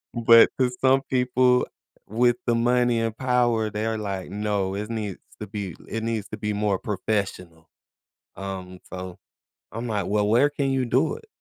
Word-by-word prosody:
But 115 0 +7
'cause 125 -1 +1
some 135 +1 +4
people 125 0 +3 0.4
with 120 +3 +2
the 120 - +3
money 120 0 +2
and 115 -1 -2
power, 120 -4 +1
they 105 +1 -2
are 110 - -1
like, 100 -3 -4
"No, 100 -2 -1
is 105 +2 -4
needs 105 -4 -4 0.2
to 105 - -5
be 100 -2 -5
l - - -17
it 115 0 -3
needs 115 -2 -2
to 105 - -6
be 105 0 -2
more 105 -1 +1
professional." 95 -5 -3 0.7
Um, 95 -2 -6
so 90 -1 -7 0.6
I'm 115 +2 -4
like, 105 -4 -1
"Well, 105 0 +1
where 120 +7 +4
can 140 -2 -1
you 135 -1 +1
do 120 +3 +2
it?" 450 - -20
110 Hz, 180 wpm, -25 LUFS, 100-120 Hz, 0.7 s, But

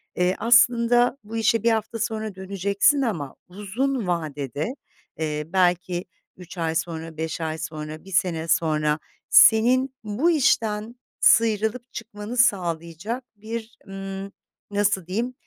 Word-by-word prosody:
eee, 180 +1 +1
aslında 240 +1 +4
bu 220 +2 -6
işe 225 0 +2
1 230 - +4
hafta 225 +1 -2
sonra 215 -2 -3
döneceksin 200 - +1
ama 165 - -3
uzun 210 +5 -2
vadede, 155 - -3 0.4
eee, 150 -1 -2
belki 180 0 +1 0.3
3 180 0 -12
ay 165 -1 -1
sonra, 165 -1 -4
5 160 +1 -3
ay 160 -1 -2
sonra, 155 0 -6
1 195 - -12
sene 175 -4 0
sonra 155 -2 +1 0.3
senin 255 +4 +6
bu 230 +12 +1
işten 225 -6 +1 0.2
sıyrılıp 225 +2 +3
çıkmanı 220 +1 -7
sağlayacak 185 +1 0
bir, 225 +1 -7
ımm, 195 0 -6 0.4
nasıl 200 -3 +1
diyeyim, 230 +7 -2
200 Hz, 125 wpm, -24 LUFS, 170-230 Hz, 0.4 s, senin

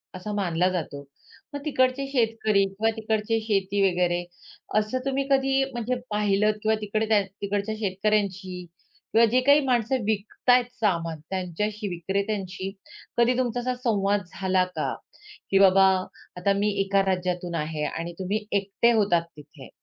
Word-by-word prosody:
असा 185 +3 -6
मानला 180 -3 +1
जातो. 155 -6 -4 0.5
मग 285 - -3
तिकडचे 260 -2 +1
शेतकरी 225 -5 +2
किंवा 200 +3 -1
तिकडचे 220 0 0
शेती 200 -2 0
वगैरे 175 -1 0 0.5
असं 215 +4 +1
तुम्ही 275 0 0
कधी 270 0 +3
म्हणजे 240 0 -2
पाहिलत 210 0 +2
किंवा 220 0 +3
तिकडे 215 +1 -1
त्या 215 -2 +5 0.2
तिकडच्या 205 +2 -2
शेतकऱ्यांशी 195 -2 -1 0.5
किंवा 230 +1 +6
जी 255 - +4
काही 285 +3 +6
माणसं 245 -1 +1
विकत 215 +3 -3
आहेत 245 0 +6
सामान 170 -6 0
त्यांच्याशी, 200 +3 -3
विक्रेत्यांशी 195 +1 -3 0.5
कधी 240 +1 +3
तुमचा 245 -1 0
असा 250 +1 -1
संवाद 205 -4 +1 0.2
झाला 185 -1 +3
का? - - -1 0.6
की 195 - +5
बाबा 195 0 +6 0.5
आता 195 +2 +2
मी 205 +1 +1
एका 195 0 +2
राज्यातून 180 -2 -1
आहे 155 -1 -3
आणि 170 +2 -4
तुम्ही 205 +3 -2
एकटे 200 +4 +2
होतात 200 -6 +3 0.2
तिथे 145 -2 -13
205 Hz, 140 wpm, -25 LUFS, 185-225 Hz, 0.6 s, किंवा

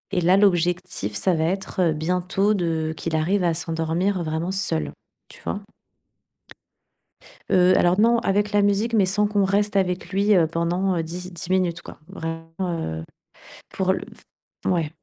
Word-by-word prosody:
et 180 - +2
là, 180 +3 +4
l'objectif, 175 - +1
ça 185 - +2
va 160 -1 0
être, 190 +3 -3
heu, 165 -3 +3
bientôt 180 +6 0
de 165 -4 -1
qu'il 160 +1 -3
arrive 180 +5 +1
à 170 -1 +2
s'endormir, 165 +3 -1
vraiment 160 +3 -2
seul, 80 - 0 0.4
tu - - -16
vois? 205 - -4 1.9
Heu, 185 0 +5
alors, 175 +3 +3
non, 235 +2 +4
avec 205 0 0
la 205 - +4
musique 205 +3 +1
mais 205 -4 +4
sans 205 +3 +2
qu'on 205 -1 +1
reste 200 +2 +1
avec 180 -2 0
lui, 200 +2 +2
heu, 165 -3 +4
pendant, 175 +3 0
heu, 165 - -1
di 180 +3 -6
dix 175 +1 -8
minutes 180 -2 +1
quoi, - - -12
vraiment, 165 0 -6
heu, 160 - -3 0.7
pour 190 -1 0
le - - -4 0.6
f - - +2
ouais. 165 -4 0
180 Hz, 170 wpm, -23 LUFS, 165-195 Hz, 1.9 s, Heu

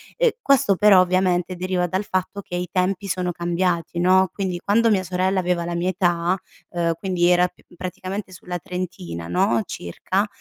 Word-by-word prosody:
ehm, - - +3
questo 275 - +4
però, 205 0 +6
ovviamente, 185 0 +1
deriva 180 0 -1
dal 185 +3 -1
fatto 185 +1 -2
che 180 - -7
i 180 0 -3
tempi 185 +1 0
sono 180 -1 -1
cambiati 170 0 -1
no, 185 +1 +4
quindi 185 -3 -3
quando 225 +3 +3
mia 195 -3 +3
sorella 185 +2 0
aveva 175 -1 0
la 175 - -3
mia 170 +2 0
età, 175 -1 +1 0.3
uhm, 170 -1 0
quindi 180 -2 0
era 180 0 +4
p - - -22
praticamente 185 +2 -5
sulla 180 0 -6
trentina, 90 - -6
no, 100 +6 +2
circa, 185 - -2
180 Hz, 175 wpm, -22 LUFS, 175-190 Hz, 0.3 s, però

